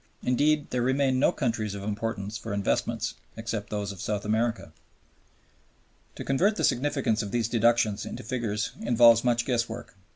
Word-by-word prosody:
Indeed 145 Hz, +4 st, +2 dB
there 125 Hz, -, 0 dB
remain 130 Hz, +1 st, +2 dB
no -, -, +4 dB
countries 110 Hz, -6 st, -2 dB
of 100 Hz, -, -6 dB
importance 105 Hz, 0 st, -3 dB
for 110 Hz, -1 st, -4 dB
investments 100 Hz, -1 st, -1 dB, 0.2 s
except 115 Hz, -2 st, -4 dB
those 105 Hz, -1 st, -3 dB
of 100 Hz, -, -9 dB
South 105 Hz, -1 st, -2 dB
America. 115 Hz, +2 st, -1 dB, 1.4 s
To -, -, -6 dB
convert 190 Hz, +11 st, +2 dB
the -, -, -2 dB
significance 130 Hz, -4 st, +1 dB
of 105 Hz, -, -5 dB
these 115 Hz, +1 st, 0 dB
deductions 115 Hz, -3 st, +2 dB
into -, -, -7 dB
figures 115 Hz, -2 st, -2 dB
involves 115 Hz, -1 st, +6 dB
much 120 Hz, -1 st, +1 dB
guesswork. 120 Hz, -3 st, -2 dB
115 Hz, 155 wpm, -27 LUFS, 105-125 Hz, 1.4 s, involves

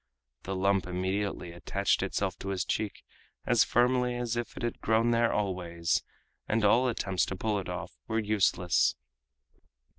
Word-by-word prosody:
The 95 Hz, -, -4 dB
lump 95 Hz, 0 st, +1 dB
immediately 95 Hz, 0 st, -2 dB
attached 100 Hz, +3 st, 0 dB
itself -, -, -1 dB
to 95 Hz, -, -5 dB
his 95 Hz, -1 st, -1 dB
cheek 105 Hz, -2 st, -2 dB, 0.4 s
as -, -, +4 dB
firmly 125 Hz, 0 st, +2 dB
as 120 Hz, -1 st, -2 dB
if 120 Hz, -1 st, -4 dB
it -, -, -5 dB
had 120 Hz, -, -3 dB
grown 115 Hz, +1 st, +3 dB
there 115 Hz, 0 st, +3 dB
always, 90 Hz, -4 st, -1 dB, 0.5 s
and 110 Hz, 0 st, +1 dB
all 120 Hz, +5 st, +5 dB
attempts 95 Hz, -6 st, 0 dB
to 95 Hz, -, -3 dB
pull 105 Hz, +2 st, -1 dB
it 95 Hz, -, -6 dB
off -, -, -6 dB
were 110 Hz, -, -1 dB
useless. 100 Hz, -5 st, +2 dB
100 Hz, 155 wpm, -29 LUFS, 95-115 Hz, 0.5 s, all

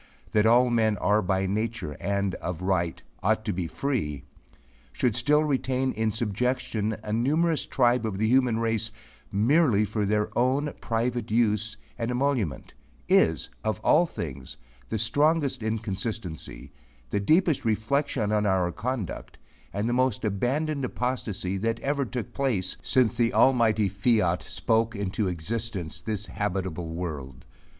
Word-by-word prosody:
"that 105 Hz, 0 st, +3 dB
all 120 Hz, +2 st, +5 dB
men 110 Hz, -3 st, +2 dB
are 105 Hz, +1 st, +2 dB
by 95 Hz, 0 st, 0 dB
nature 110 Hz, -3 st, -2 dB
and 100 Hz, 0 st, -1 dB
of 90 Hz, 0 st, -4 dB
right 85 Hz, -3 st, 0 dB, 0.2 s
ought 110 Hz, +2 st, +1 dB
to 105 Hz, -, 0 dB
be 85 Hz, -1 st, -2 dB
free," 80 Hz, -, -2 dB, 0.7 s
should 125 Hz, -3 st, 0 dB
still 150 Hz, +7 st, +3 dB
retain 130 Hz, -2 st, 0 dB
in 110 Hz, 0 st, 0 dB
subjection 110 Hz, 0 st, -1 dB
a 105 Hz, -, -3 dB
numerous 155 Hz, +8 st, +1 dB
tribe 125 Hz, -1 st, +2 dB
of 110 Hz, -4 st, -2 dB
the 110 Hz, +2 st, +1 dB
human 125 Hz, -1 st, +3 dB
race 115 Hz, 0 st, 0 dB, 0.4 s
merely 115 Hz, 0 st, +3 dB
for 105 Hz, 0 st, -2 dB
their 105 Hz, +1 st, 0 dB
own 135 Hz, +4 st, +1 dB
private 115 Hz, 0 st, -1 dB
use 110 Hz, -1 st, +1 dB, 0.2 s
and 115 Hz, 0 st, -1 dB
emolument, 125 Hz, -, -1 dB, 0.3 s
is, -, -, +3 dB, 0.2 s
of 110 Hz, 0 st, -1 dB
all 175 Hz, +9 st, +4 dB
things 70 Hz, -, -6 dB, 0.3 s
the -, -, -1 dB
strongest 140 Hz, +4 st, +2 dB
inconsistency, 110 Hz, -4 st, -4 dB, 0.4 s
the -, -, +1 dB
deepest 160 Hz, -, +3 dB
reflexion 110 Hz, 0 st, 0 dB
on 105 Hz, -1 st, +2 dB
our 95 Hz, -2 st, +2 dB
conduct, 120 Hz, -2 st, -4 dB, 0.3 s
and 100 Hz, +4 st, -2 dB
the 120 Hz, -, 0 dB
most 130 Hz, -3 st, +1 dB
abandoned 135 Hz, +8 st, 0 dB
apostasy 110 Hz, -7 st, -2 dB
that 115 Hz, +3 st, -1 dB
ever 140 Hz, 0 st, 0 dB
took 120 Hz, -3 st, -5 dB
place, 115 Hz, -10 st, 0 dB
since 125 Hz, -4 st, +2 dB
the 115 Hz, 0 st, +1 dB
almighty 115 Hz, -5 st, +4 dB
fiat 100 Hz, -3 st, +2 dB
spoke 115 Hz, 0 st, 0 dB
into 100 Hz, +1 st, -1 dB
existence 95 Hz, 0 st, -4 dB
this 105 Hz, -2 st, -3 dB
habitable 95 Hz, -6 st, -3 dB
world. 80 Hz, -5 st, -6 dB
110 Hz, 140 wpm, -27 LUFS, 100-125 Hz, 0.7 s, all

